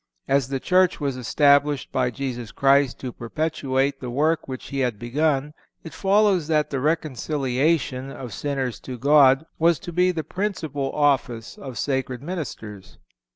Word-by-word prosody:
As 135 -2 +2
the 135 0 -2
Church 185 +4 +2
was 140 -3 -2
established 140 +3 +2
by 130 -1 +1
Jesus 125 -3 -5
Christ 140 0 +3
to 130 - -4
perpetuate 135 0 -1
the 125 - -6
work 155 +6 0
which 130 -1 -7
he 140 - -3
had 125 -5 0
begun, 145 +4 0 0.3
it 165 - -9
follows 195 -4 +2
that 155 -2 +1
the 135 - -1
reconciliation 140 -2 0
of 125 -5 -8
sinners 135 -3 -3
to 130 -1 -7
God 140 +2 +5
was 165 0 +4
to 175 -3 -8
be 180 +2 +3
the 165 -3 -3
principal 160 -6 -3
office 135 -6 0
of 130 -4 -9
sacred 130 -2 -2
ministers. 120 - -7
140 Hz, 155 wpm, -23 LUFS, 130-155 Hz, 0.3 s, God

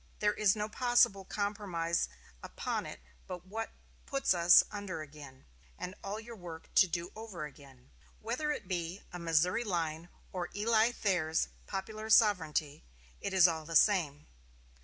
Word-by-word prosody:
There 210 0 +2
is 210 -2 +3
no 210 0 -2
possible 235 -4 +3
compromise 190 - -1 0.3
upon - - -3
it - - -9 0.3
but 180 -1 -7
what 225 +4 -4 0.4
puts 275 -7 +2
us 175 0 +7
under 200 -6 -5
again, 145 -3 -13 0.3
and 180 - -5
all 200 +1 -3
our 230 +1 -9
work 170 -5 -10
to 190 - +6
do 175 +1 -3
over 215 -8 -6
again. 135 -3 -15 0.3
Whether 250 +7 -2
it 245 -10 -4
be 175 +1 -3
a 175 - -5
Missouri 170 +7 +2
line 170 -4 -2 0.2
or 180 -2 -3
Eli 220 +2 +3
Thayer's 175 -8 0 0.2
popular 215 +3 -5
sovereignty, 160 -9 +3 0.4
it 200 - -3
is 185 -2 +7
all 160 -2 -2
the 165 +2 -6
same. 155 -7 +3
185 Hz, 150 wpm, -32 LUFS, 165-215 Hz, 0.4 s, us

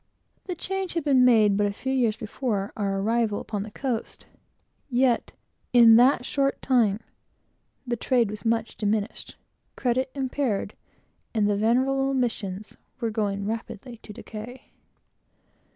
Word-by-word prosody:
The 360 - -4
change 385 +1 -3
had 335 - 0
been 270 -3 +4
made 220 -5 +5
but 205 0 +2
a - - -1
few 265 +6 -3
years 235 -5 +1
before 215 -3 -3
our 195 -2 -1
arrival 220 0 +1
upon 205 -2 -4
the 210 - -6
coast, 235 +1 -4 0.6
yet, 250 -1 +2 0.4
in 230 -2 +8
that 245 0 +4
short 275 -1 0
time, 230 -5 +2 0.8
the 240 -1 -1
trade 235 -2 +1
was 210 - -8
much 225 -1 -1
diminished, 210 0 -2 0.4
credit 255 +1 0
impaired, 260 -6 -1 0.6
and 210 -2 +3
the 205 - +2
venerable 265 +5 +1
missions 215 -5 -3 0.3
going 200 -2 -1
rapidly 230 +2 -5
to 215 - -12
decay. 230 +3 -10
230 Hz, 135 wpm, -25 LUFS, 210-260 Hz, 0.8 s, in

